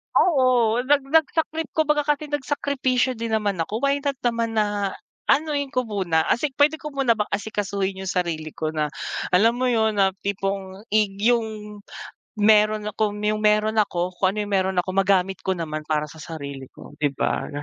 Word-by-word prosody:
Oo, 255 -8 +4
nag 285 +1 +4
nagsakrip 320 0 +1
kumbaga 300 -2 +2
kasi 295 0 -1
nagsakripisyo 265 -3 0
din 230 0 -3
naman 205 -3 0
ako. 220 +3 -4
Why 280 0 +2
not 280 0 -1
naman 230 -1 0
na 205 -2 0 0.3
anuhin 285 -1 +1
ko 255 - +2
muna, 185 -6 +1
asik 270 +2 +1
puwede 295 +3 +3
ko 300 -2 -8
muna 260 -5 +2
bang 210 - 0
asikasuhin 200 -2 -2
'yong 190 0 -4
sarili 165 -4 -2
ko 155 - -3
na, 150 -1 -2 0.4
alam 225 +6 +4
mo 255 - 0
'yon, 220 -3 +1
na 195 -1 +3
tipong, 195 0 -3
ig 210 -2 +2
'yong 215 -2 -1 0.6
mayro'n 215 0 +4
akong 210 -1 -1
'yong 215 0 0
meron 215 0 +3
ako 180 -2 -2
kung 185 +1 +1
ano - - -7
'yong 205 - -5
meron 190 -1 +1
ako, 180 +1 +1
magamit 190 -1 +2
ko 190 -1 -1
naman 155 -2 -4
para 150 -1 +1
sa 155 +1 -12
sarili 140 -4 -7
ko, - - -14
'di 145 - +3
ba? - - -1
210 Hz, 175 wpm, -23 LUFS, 190-255 Hz, 0.6 s, Oo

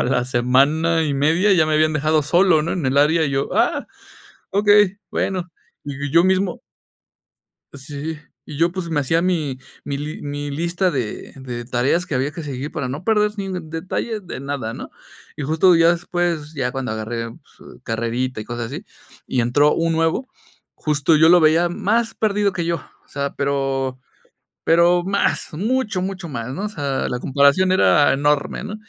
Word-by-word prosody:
a - - +3
la 125 -1 +1
semana 140 +7 +2
y 145 -2 -1
media 165 +9 +3
ya 165 -4 +4
me 155 - 0
habían 155 0 +3
dejado 155 0 +1
solo, 175 -1 +4
¿no?, 165 - -2
en 175 -5 -3
el 130 - 0
área 160 +2 +4
y 140 - -1
yo, 135 0 -1
"Ah, - - +1 0.6
okey". 205 0 +4
Bueno, 180 -2 -2 0.3
y 145 0 -5
yo 170 +4 +5
mismo 190 -1 +1 1.1
Sí. 145 +3 -6 0.3
Y 150 - -8
yo, 170 +2 +2
pues, 180 -2 -5
me 150 -3 0
hacía 160 +5 +1
mi 155 -8 -1 0.3
mi 140 - -3
li 150 +2 -6
mi 145 0 -5
lista 170 +5 0
de 125 -8 -4
de 125 -3 -7
tareas 130 +8 0
que 180 - -6
había 135 +3 0
que 165 - -7
seguir 140 0 -5
para 140 -4 -3
no 140 +7 -5
perder 210 0 +2
ni 195 -1 -4
detalle 170 +7 -4
de 180 -9 -8
nada, 140 -5 -4
¿no?, - - -8 0.4
y - - -6
justo 160 +5 +4
ya 165 0 +5
después, 170 -3 -1
ya 130 -4 -2
cuando 135 -3 -4
agarré, 115 +1 -4
pues, - - -17
carrerita 115 +2 -2
y 105 - -6
cosas 120 -1 -4
así, 145 - -7 0.4
y 125 - 0
entró 145 +6 +3
un 165 0 0
nuevo, 165 +11 0 0.5
justo 150 +1 +1
yo 160 +1 +5
lo 175 +1 +7
veía 160 +3 +4
más 220 +5 0
perdido 205 -2 0
que 175 -3 -2
yo. 170 0 0 0.3
O - - -32
sea, 140 0 -4
pero 135 -2 -1 0.6
pero 170 +1 +4
más, 200 +2 0
mucho, 210 +2 -1
mucho 190 -3 -5
más, 125 -2 -5
¿no?, 195 +9 -4
o - - -3
sea, 140 -8 -2
la 125 - -3
comparación 140 +8 +3
era 150 -5 +4
enorme, 145 +4 0
¿no?, 210 +1 -5
155 Hz, 185 wpm, -20 LUFS, 135-175 Hz, 1.1 s, lo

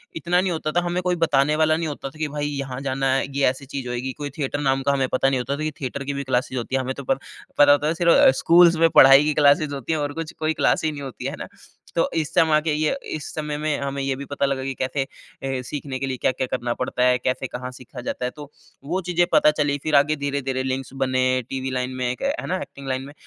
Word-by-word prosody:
इतना 170 +3 +1
नहीं 185 -1 -1
होता 155 -2 -2
था, 175 - +2
हमें 175 +1 -1
कोई 180 0 +1
बताने 145 0 +2
वाला 155 0 +3
नहीं 165 0 -2
होता 145 -2 -5
था 155 +3 -17
कि 155 - 0
भाई 145 0 -3
यहाँ 135 -3 -4
जाना 135 -1 0
है, 135 - +1
ये 140 - +3
ऐसी 130 +2 -6
चीज़ 135 -2 -6
होएगी, 125 +2 -3
कोई 145 +1 -6
थिएटर 145 -1 -2
नाम 135 -1 +1
का - - +5
हमें 135 -2 +1
पता 130 +1 +3
नहीं 135 -1 0
होता 135 +3 -2
था 155 - -4
कि 155 - -1
थिएटर 140 +1 -4
की 140 +1 -3
भी 140 0 -3
क्लासेस 130 0 -1
होती 125 +2 -3
है। 135 - +2
हमें 130 0 -3
तो 140 - -7
प 135 - +3 0.4
पता 145 0 +8
होता 145 +1 +3
है 160 - +1
सिर्फ़ 170 -4 +5
स्कूल्स 170 0 +6
में 165 0 +5
पढ़ाई 135 -1 +8
की 150 0 +1
क्लासेज़ 145 0 +3
होती 140 +3 -3
हैं 155 - 0
और 145 -1 -2
कुछ 165 +1 -5
कोई 155 0 0
क्लास - - +1
ही 155 - +1
नहीं 145 -1 -7
होती 135 -2 -7
है - - -1
है - - -8
ना। - - -6 0.5
तो 165 - +2
इस 155 -3 -1
समा 155 -2 +4
के 160 0 -1
ये 155 - +1 0.2
इस 155 - -6
समय 150 -1 -3
में 150 -1 -1
हमें 140 0 -3
ये 135 -1 -1
भी 140 +1 -7
पता 140 0 -1
लगा 135 -1 -1
कि 135 0 -3
कैसे 130 +2 -1 0.4
हे 135 -1 -2
सीखने 140 0 -5
के 135 - -2
लिए 130 -1 -3
क्या-क्या 130 +1 0
करना 120 -1 -2
पड़ता 125 0 -2
है? 125 0 +4
कैसे 130 +1 -2
कहाँ 125 +1 -6
सीखा 125 0 -10
जाता 125 - -4
है? 125 - -2
तो 145 -1 -10 0.3
वो 180 +6 -1
चीज़ें 175 -1 +1
पता 150 - +6
चली 145 -2 0
फिर 155 -1 +1
आगे 150 +2 +4
धीरे-धीरे 140 -2 -2
लिंक्स 130 0 -3
बने। 130 -1 0 0.3
टीवी 130 0 -3
लाइन 125 0 -2
में 125 -1 -1
एक 125 - -7
है 280 +4 -1
ना, 185 - 0
एक्टिंग 140 -1 -9
लाइन 130 0 -1
में 145 - -11
140 Hz, 275 wpm, -23 LUFS, 130-155 Hz, 0.5 s, पता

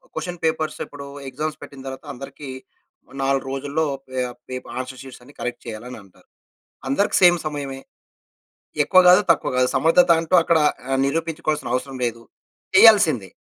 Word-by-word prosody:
Question 175 +2 -5
papers 160 -1 -1
ఇప్పుడు 140 -1 -10 0.2
exams 150 +4 -4
పెట్టిన 135 -1 -11
తరువాత 135 +3 -8
అందరికి 135 +2 -9 0.7
4 135 0 +1
రోజుల్లో 140 +3 -2 0.2
పే 130 0 -3 0.3
పేప్ 130 0 -6
ఆన్సర్ 130 0 -6
షీట్స్ 130 -2 -12
అన్ని 140 +4 -17
కరెక్ట్ 125 - -4
చేయాలి 115 0 -7
అని 125 - -8
అంటారు. 95 -2 -24 0.6
అందరికి 140 +10 +1
సేమ్ 175 -1 +7
సమయమే. 140 -3 -5 1.0
ఎక్కువ 185 - +5
కాదు, 180 0 +7
తక్కువ - - 0
కాదు 125 0 +3
సమర్ధత 175 +2 +4
అంటూ 165 +2 -6
అక్కడ 165 0 +3 0.3
ఆహ్, 135 0 +1
నిరూపించుకోవాల్సిన 155 -2 -2
అవసరం 130 +1 -3
లేదు, 115 -1 -4 0.5
చేయాల్సిందే. 190 - +6
140 Hz, 150 wpm, -22 LUFS, 130-160 Hz, 1.0 s, సేమ్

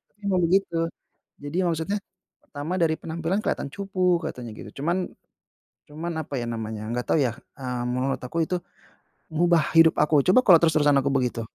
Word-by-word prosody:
tapi - - -45
emang 190 -2 +2
begitu. 175 0 +2 0.6
Jadi 145 +2 -7
ya - - 0
maksudnya, 165 +6 -2 0.5
"Pertama, 145 +4 -5
dari 165 -3 +2
penampilan 165 +4 -2
kelihatan 175 - -2
cupu," 185 -2 0
katanya 120 -7 -6
gitu. 140 - -9
Cuman 170 +3 +1 0.9
cuman 165 +3 -5
apa 145 - -10
ya 120 - -2
namanya, 110 -2 -4
nggak 125 0 -2
tahu - - +4
ya. 120 - -1 0.2
Eee, 125 -2 -3
menurut 130 +2 -1
aku, 125 +6 -6
itu 180 +2 -1 0.7
ngubah 170 0 +3 0.2
hidup 165 0 +6
aku, 150 +1 +2
coba 185 +7 +6
kalau 175 -7 +7
terus-terusan 150 -3 +3
aku 140 +1 0
begitu. 125 -3 0
160 Hz, 170 wpm, -25 LUFS, 135-175 Hz, 0.9 s, kalau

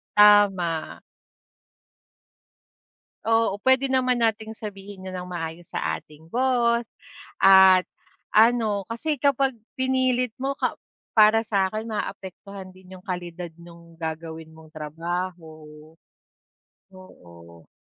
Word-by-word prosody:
Tama. 200 -6 +4 2.3
Oo, 225 -3 +2
pwede 260 +1 +4
naman 255 -2 +1
nating 220 -1 -1
sabihin 195 -3 -9
'yon 185 - -9
ng 180 - -6
maayos 165 0 -6
sa - - -3
ating 155 +2 -19
boss 240 -2 +1 0.6
at, 190 -1 +8 0.5
ano, 220 -3 +3
kasi 280 +6 -3
kapag 270 -2 +1 0.2
pinilit 260 -2 +1
mo 270 +2 -2
ka - - -2 0.4
para 215 +1 +6
sa'kin, 215 +1 -1
maapektuhan 195 -1 -7
din 185 0 -15
yung 185 - -13
kalidad 175 -2 -6
nong 170 -1 -15
gagawin 160 0 -6
mong 160 -1 -16
trabaho 165 +2 -5 1.4
oo. 85 - -16
195 Hz, 100 wpm, -24 LUFS, 170-230 Hz, 2.3 s, at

